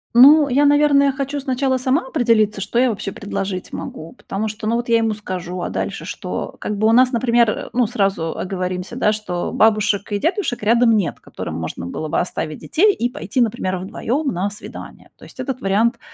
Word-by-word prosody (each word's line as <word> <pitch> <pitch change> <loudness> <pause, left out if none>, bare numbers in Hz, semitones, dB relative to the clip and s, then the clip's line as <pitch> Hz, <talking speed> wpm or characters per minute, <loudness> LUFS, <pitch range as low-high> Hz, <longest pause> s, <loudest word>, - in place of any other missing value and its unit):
Ну, 285 +4 +8
я, 280 +3 +3
наверное, 285 -1 +4
хочу 280 +1 -3
сначала 260 0 0
сама 260 +1 0
определиться, 220 -7 +2
что 210 +5 -1
я 255 -1 +4
вообще 205 -2 -4
предложить 195 -2 -4
могу, 160 +1 -7
потому 210 +3 -4
что, 215 +1 -6
ну, 225 - +1
вот 240 0 -4
я 230 - +5
ему 225 -1 +1
скажу, 185 -3 -5
а - - -3
дальше - - -3
что? - - -5
Как 210 - -3
бы 215 +2 +2
у - - +4
нас, 250 +2 +5
например, 235 -2 +3
э, - - -6
ну, 245 0 +3
сразу 195 -7 -1
оговоримся, 185 +2 -4
да, 210 -4 +2
что 180 -5 -3
бабушек 210 -2 +2
и 205 - +1
дедушек 325 - -1
рядом 230 +1 +4
нет, 195 -5 -2
которым 80 +1 -6
можно 80 +1 -5
было 155 - -5
бы - - 0
оставить 160 -3 -3
детей 410 +6 +3
и 240 - 0
пойти, 265 0 -4
например, 215 -5 0
вдвоём 245 - -2
на 185 +3 -1
свидание. 210 - -11
То - - -15
есть - - -17
этот 265 -2 -4
вариант 225 +5 +1
225 Hz, 200 wpm, -20 LUFS, 195-255 Hz, -, Ну